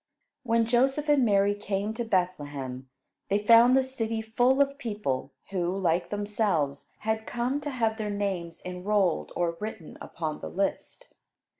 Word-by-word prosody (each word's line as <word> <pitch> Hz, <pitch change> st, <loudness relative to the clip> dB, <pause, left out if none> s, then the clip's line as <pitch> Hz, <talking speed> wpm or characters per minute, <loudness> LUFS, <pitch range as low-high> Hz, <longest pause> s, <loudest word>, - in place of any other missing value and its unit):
When 230 Hz, -3 st, +2 dB
Joseph 265 Hz, +5 st, +2 dB
and 290 Hz, -3 st, +5 dB
Mary 200 Hz, -2 st, +3 dB
came 205 Hz, +1 st, -2 dB
to 235 Hz, +1 st, -3 dB
Bethlehem 145 Hz, -, -2 dB, 0.4 s
they 200 Hz, -, +3 dB
found 230 Hz, +4 st, +6 dB
the 265 Hz, -, +4 dB
city 230 Hz, -4 st, -2 dB
full 245 Hz, +4 st, +2 dB
of 280 Hz, 0 st, +2 dB
people 205 Hz, -, -3 dB, 0.2 s
who, 180 Hz, -1 st, -1 dB
like 175 Hz, -2 st, +1 dB
themselves, 205 Hz, -9 st, -1 dB
had 220 Hz, 0 st, -2 dB
come 250 Hz, +4 st, -1 dB
to 290 Hz, -, -4 dB
have 225 Hz, -4 st, -1 dB
their 210 Hz, -1 st, -2 dB
names 195 Hz, -5 st, -3 dB
enrolled 180 Hz, 0 st, 0 dB
or 170 Hz, -1 st, -1 dB
written 210 Hz, -6 st, -7 dB
upon 155 Hz, -2 st, -4 dB
the -, -, -6 dB
list. 200 Hz, -, -3 dB
210 Hz, 150 wpm, -28 LUFS, 180-235 Hz, 0.4 s, found